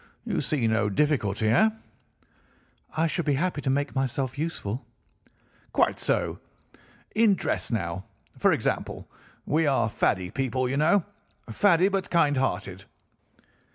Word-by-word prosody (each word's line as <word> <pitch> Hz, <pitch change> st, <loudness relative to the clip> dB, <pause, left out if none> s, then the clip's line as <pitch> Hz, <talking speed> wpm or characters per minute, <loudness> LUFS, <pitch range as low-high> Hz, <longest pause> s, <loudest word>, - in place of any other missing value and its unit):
You -, -, -1 dB
see 140 Hz, -6 st, 0 dB
no 110 Hz, -2 st, +2 dB
difficulty, 110 Hz, -4 st, +1 dB
heh?' 135 Hz, -, +5 dB, 1.3 s
"'I 160 Hz, -, +3 dB
should 165 Hz, +1 st, -1 dB
be 145 Hz, -2 st, +2 dB
happy 170 Hz, +1 st, -1 dB
to 135 Hz, -, -1 dB
make 140 Hz, +2 st, 0 dB
myself 135 Hz, -1 st, -1 dB
useful.' 140 Hz, -, -4 dB, 0.9 s
"'Quite -, -, +2 dB
so. -, -, 0 dB, 0.7 s
In 215 Hz, -2 st, +4 dB
dress -, -, -1 dB
now, 95 Hz, -4 st, -3 dB, 0.3 s
for -, -, +3 dB
example. -, -, -2 dB, 0.4 s
We 155 Hz, +2 st, +2 dB
are 120 Hz, -6 st, +2 dB
faddy 90 Hz, -3 st, 0 dB
people, 130 Hz, -1 st, -1 dB
you 135 Hz, +2 st, -1 dB
know—faddy 170 Hz, -, +1 dB
but 195 Hz, -1 st, -2 dB
kind 150 Hz, -4 st, +3 dB
hearted. 95 Hz, -7 st, -2 dB
135 Hz, 125 wpm, -26 LUFS, 110-160 Hz, 1.3 s, heh